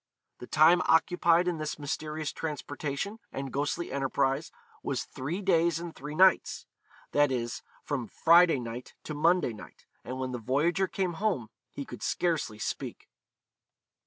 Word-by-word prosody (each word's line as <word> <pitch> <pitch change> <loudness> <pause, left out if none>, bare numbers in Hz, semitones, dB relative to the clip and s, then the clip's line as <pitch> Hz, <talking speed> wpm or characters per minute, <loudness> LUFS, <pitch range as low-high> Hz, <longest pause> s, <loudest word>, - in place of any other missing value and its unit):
The 125 - -9
time 165 +4 +5
occupied 170 +1 +4
in 170 -3 -1
this 155 0 -3
mysterious 150 +1 -3
transportation 150 +6 -4
and 135 -2 -5
ghostly 145 +5 -2
enterprise 135 +2 0 0.3
was - - -2
three 165 +10 -5
days 170 -3 +3
and 170 -1 -6
three 150 +2 -7
nights; 185 +1 +4 0.5
that 145 -1 +3
is, 120 -2 -2 0.2
from 135 -6 -3
Friday 170 -3 +5
night 120 +1 -7
to 155 - -5
Monday 165 -3 +2
night; 105 - -13 0.2
and 130 +1 -5
when 130 -1 -3
the 125 - -4
voyager 155 - +1
came 185 -2 -1
home 185 - 0 0.2
he - - -6
could - - -9
scarcely 160 -11 -1
speak. - - -5
155 Hz, 145 wpm, -29 LUFS, 135-170 Hz, 0.5 s, time